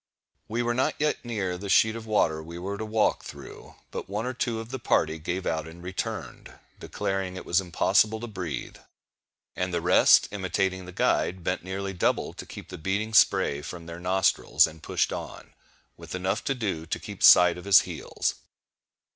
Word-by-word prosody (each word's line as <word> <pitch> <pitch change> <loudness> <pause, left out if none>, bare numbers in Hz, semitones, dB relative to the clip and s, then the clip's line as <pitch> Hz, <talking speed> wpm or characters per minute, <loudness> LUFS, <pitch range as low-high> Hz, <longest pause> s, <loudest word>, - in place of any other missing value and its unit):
We 115 +3 -1
were 120 0 0
not 130 +2 0
yet 150 0 0
near 100 -7 -3
the 100 +1 -6
sheet 110 +3 +4
of 115 -1 -8
water 80 -7 +1
we 85 +2 -9
were 95 +3 -4
to 110 - -5
walk 110 0 +1
through; - - -11 0.2
but - - -6
one 105 +3 -2
or 130 - -2
two 120 -2 -2
of 115 0 -8
the 130 +1 -5
party 80 -7 +1
gave 90 +4 -3
out 80 -1 -2
and 85 +2 -12
returned, 95 +1 -5 0.3
declaring 95 -1 -3
it 95 - -7
was 85 +2 +2
impossible 105 +5 +2
to - - -4
breathe; 90 -9 -6 0.8
and 90 0 -2
the 85 - 0
rest, - - +5
imitating 95 -1 -1
the - - -8
guide, 90 0 0
bent 90 +1 -2
nearly 95 +1 -4
double 90 - 0
to - - -9
keep - - -10
the - - -8
beating 100 +6 -2
spray 70 -8 +4
from 85 +2 -8
their 85 +1 -8
nostrils, 90 +1 +3
and 80 0 -9
pushed - - 0
on, - - -8 0.4
with - - -8
enough 95 +5 -1
to 135 - 0
do 95 -9 -3
to - - -2
keep - - -9
sight 90 -1 +8
of 90 - -10
his 100 -2 +7
heels. - - -3
95 Hz, 190 wpm, -27 LUFS, 85-110 Hz, 0.8 s, sight